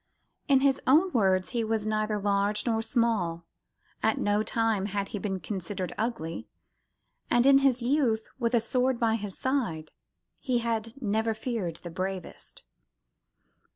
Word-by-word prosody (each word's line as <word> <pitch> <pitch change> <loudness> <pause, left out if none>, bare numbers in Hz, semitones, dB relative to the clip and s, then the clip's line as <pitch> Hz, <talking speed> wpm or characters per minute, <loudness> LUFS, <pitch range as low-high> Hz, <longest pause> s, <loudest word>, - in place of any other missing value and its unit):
In 270 -3 +4
his 275 -1 +2
own 325 +8 +5
words, 190 - +2
he 235 -1 -1
was 220 -1 -1
"neither 215 0 0
large 205 +1 0
nor 225 -2 +1
small: 220 -8 0 0.6
at - - +2
no 205 +1 +1
time 220 -2 0
had 200 -1 -3
he 205 - -4
been 190 -2 -3
considered 185 +1 -4
ugly; 190 -8 -3 0.8
and 240 +1 +3
in 275 0 +7
youth, 255 -3 +1
with 235 0 +1
a 235 - +3
sword 250 +2 0
by 225 -1 +2
his 210 -4 -4
side, 230 - -2 0.5
he 255 -3 0
had 230 +1 -2
never 220 -1 0
feared 220 -7 -3
the 175 - -7
bravest." 185 +1 -6
220 Hz, 145 wpm, -28 LUFS, 200-240 Hz, 0.8 s, in